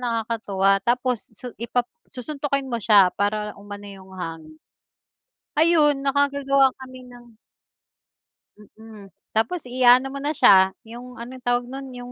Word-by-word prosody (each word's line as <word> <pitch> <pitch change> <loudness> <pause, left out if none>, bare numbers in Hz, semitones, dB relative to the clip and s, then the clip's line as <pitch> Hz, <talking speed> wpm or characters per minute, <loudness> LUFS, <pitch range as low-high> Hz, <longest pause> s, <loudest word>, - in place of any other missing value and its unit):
nakakatuwa 215 -5 0
tapos 245 0 0 0.2
su 245 +2 -8
ipa 240 +1 -1 0.2
susuntukin 275 +1 -3
mo 235 -2 -3
siya 200 -4 +5
para 210 +1 -2
umano 205 0 -10
'yong 190 -1 -12
hangin. 160 -2 -8 1.0
Ayun, 300 -4 +3
nakagagawa 275 -1 +2
kami 255 -1 -11
ng 240 -2 -16 1.2
mm, 215 -1 -15 0.3
tapos 235 +10 0
iaano 255 +1 +4
mo 275 - -7
na 295 +2 -2
siya 190 -7 +5
yung 245 +2 -10
ano 250 +2 -8
yung 255 - -19
tawag 245 0 +1
no'n 270 +1 -7
yung 245 0 -9
245 Hz, 135 wpm, -23 LUFS, 210-270 Hz, 1.2 s, siya